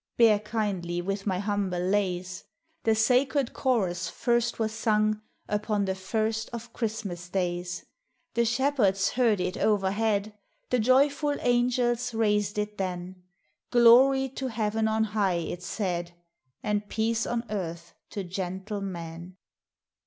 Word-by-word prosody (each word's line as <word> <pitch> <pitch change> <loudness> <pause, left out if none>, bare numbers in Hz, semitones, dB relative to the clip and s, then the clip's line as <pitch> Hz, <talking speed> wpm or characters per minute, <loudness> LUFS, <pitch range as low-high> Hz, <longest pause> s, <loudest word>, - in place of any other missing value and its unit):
(Bear 225 -3 +6
kindly 200 -5 -2
with 195 +3 -3
my 185 -2 +1
humble 200 -2 -1
lays;) 185 -1 -1 0.4
The 225 -1 +4
sacred 255 +4 +2
chorus 205 -10 0
first 240 -1 0
was 220 -1 0
sung 215 -1 +1 0.3
Upon 210 -1 0
the 190 - 0
first 220 +3 -2
of 235 0 -8
Christmas 200 -6 -4
days; 175 -1 -2 0.5
The 235 - +2
shepherds 225 -5 +2
heard 230 -5 +2
it 180 0 -2
overhead, 210 +1 +1 0.2
— - - -45
The 250 - +3
joyful 280 +5 +3
angels 245 -1 +1
raised 210 -2 +1
it 210 0 -3
then: 180 -1 -4 0.5
Glory 255 +3 +6
to 265 +1 -4
Heaven 220 -1 0
on 220 0 +2
high, 205 -3 +1
it 170 +1 -3
said, 175 -4 -3 0.5
And 210 -1 -1
peace 225 +1 0
on 240 0 -2
earth 170 -4 -4 0.2
to 200 - -4
gentle 190 +3 -4
men! 170 -1 -7
210 Hz, 130 wpm, -27 LUFS, 190-230 Hz, 0.5 s, Bear